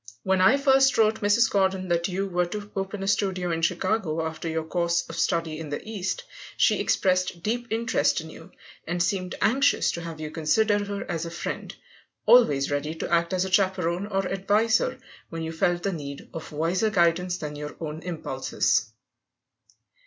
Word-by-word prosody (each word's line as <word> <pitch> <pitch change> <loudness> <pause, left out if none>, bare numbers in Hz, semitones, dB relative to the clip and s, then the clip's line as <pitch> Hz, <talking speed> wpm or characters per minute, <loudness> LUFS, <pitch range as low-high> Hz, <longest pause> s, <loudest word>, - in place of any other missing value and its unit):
When 190 -1 +2
I 225 +9 +6
first 270 -1 +4
wrote 220 0 +3
Mrs. 210 +3 +4
Gordon 190 -1 +1
that 170 0 +1
you 195 +1 -2
were 180 -1 0
to 210 +3 -6
open 195 0 -3
a - - -3
studio 190 -3 0
in 165 0 -1
Chicago 175 -2 0
after 160 +1 -4
your 160 0 -1
course 170 +1 0
of - - -8
study 165 -1 0
in 160 -2 -6
the 145 - -3
East, 220 - -3 0.3
she - - +3
expressed 185 -2 +1
deep 235 +2 -1
interest 230 -3 +1
in 160 0 -8
you, 160 - -13 0.4
and 175 +1 0
seemed 185 -3 -2
anxious 275 +5 +3
to 170 - -5
have 165 -2 -7
you 155 -1 -5
consider 205 +7 +2
her 200 0 -4
as 170 -1 -3
a - - -5
friend 170 - -5 0.5
always 145 - +5
ready 145 +2 -2
to 165 - -5
act 170 0 +2
as 185 0 +1
a 190 - -5
chaperon 185 -1 +1
or 195 -2 -1
adviser 215 - +1 0.3
when 165 -1 -5
you 160 - -3
felt 175 +1 0
the 195 - 0
need 140 -3 -7
of 160 - -7
wiser 170 +8 0
guidance 180 -2 +2
than 150 -3 -6
your 150 0 -7
own 155 -1 -5
impulses. 170 -3 -1
180 Hz, 180 wpm, -26 LUFS, 165-205 Hz, 0.5 s, I